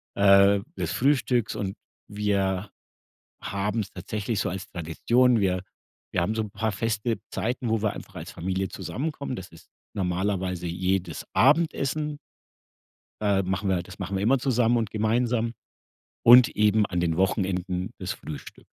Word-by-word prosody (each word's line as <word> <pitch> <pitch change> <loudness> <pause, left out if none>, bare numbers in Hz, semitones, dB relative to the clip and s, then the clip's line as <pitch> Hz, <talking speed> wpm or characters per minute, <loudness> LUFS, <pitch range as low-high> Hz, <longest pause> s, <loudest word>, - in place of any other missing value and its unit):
äh, 100 0 +6 0.2
des - - -2
Frühstücks 125 -4 +1
und 95 -1 -3 0.3
wir 100 -1 -1 0.7
haben's 105 +2 -2
tatsächlich 105 +1 -3
so - - 0
als 95 +1 -5
Tradition. 115 - +2
Wir 95 -2 +1 0.5
wir - - +1
haben 105 +6 0
so 110 - 0
'n 105 - -6
paar 110 +1 -2
feste 110 +2 -1
Zeiten, 120 +1 -2
wo 110 -1 +1
wir 105 -2 +1
einfach 95 - -10
als 85 +1 -7
Familie 95 +2 -2
zusammenkommen, 140 -2 -4
das 95 - -8
ist 80 0 -17 0.3
normalerweise 90 -1 -1
jedes 90 0 -1
Abendessen 150 0 +2 1.0
ähm, 100 -3 +1
machen 95 +1 -1
wir 95 - +2
halt 85 - -5
das - - -11
machen 95 +1 -3
wir 95 - -1
immer 130 +6 +4
zusammen 120 -2 +2
und 110 -3 -1
gemeinsam 115 +2 +1 0.7
und 120 +1 +9
eben 105 0 +3
an 90 -2 -2
den 85 -2 0
Wochenenden 95 0 0
das 95 -1 -3
Frühstück. 75 - -9
100 Hz, 150 wpm, -26 LUFS, 95-115 Hz, 1.0 s, und